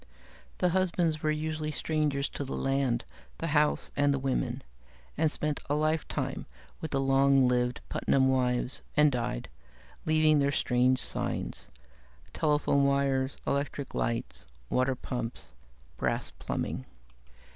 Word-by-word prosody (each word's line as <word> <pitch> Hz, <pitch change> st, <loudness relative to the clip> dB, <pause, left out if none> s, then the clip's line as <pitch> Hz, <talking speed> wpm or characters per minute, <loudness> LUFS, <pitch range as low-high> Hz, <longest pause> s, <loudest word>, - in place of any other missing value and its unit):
The 180 Hz, -, +2 dB
husbands 170 Hz, -3 st, +1 dB
were 155 Hz, -, +1 dB
usually 155 Hz, 0 st, -2 dB
strangers 150 Hz, -2 st, 0 dB
to -, -, -5 dB
the 135 Hz, -, -4 dB
land, 135 Hz, -3 st, 0 dB, 0.3 s
the -, -, -3 dB
house, 150 Hz, 0 st, +2 dB
and 145 Hz, 0 st, +3 dB
the 140 Hz, -, +1 dB
women, 135 Hz, -1 st, -1 dB, 0.5 s
and 155 Hz, 0 st, +2 dB
spent 150 Hz, -2 st, -2 dB
a 145 Hz, -, +2 dB
lifetime 155 Hz, +1 st, -1 dB, 0.3 s
with 160 Hz, -, -4 dB
the 135 Hz, -, 0 dB
long 135 Hz, 0 st, +4 dB
lived 125 Hz, 0 st, +1 dB
Putnam 130 Hz, -1 st, +2 dB
wives, 125 Hz, -1 st, +1 dB, 0.2 s
and 150 Hz, 0 st, +6 dB
died, 120 Hz, -, -2 dB, 0.6 s
leaving 155 Hz, -1 st, +4 dB
their 140 Hz, 0 st, +2 dB
strange 130 Hz, -1 st, +2 dB
signs: -, -, -3 dB, 0.7 s
telephone 150 Hz, -2 st, +2 dB
wires, 140 Hz, -1 st, +1 dB
electric 140 Hz, -1 st, -2 dB
lights, 115 Hz, 0 st, -2 dB, 0.2 s
water 130 Hz, +1 st, +2 dB
pumps, 120 Hz, -, -5 dB, 0.4 s
brass -, -, -1 dB
plumbing. 65 Hz, -, -4 dB
140 Hz, 125 wpm, -29 LUFS, 130-155 Hz, 0.7 s, and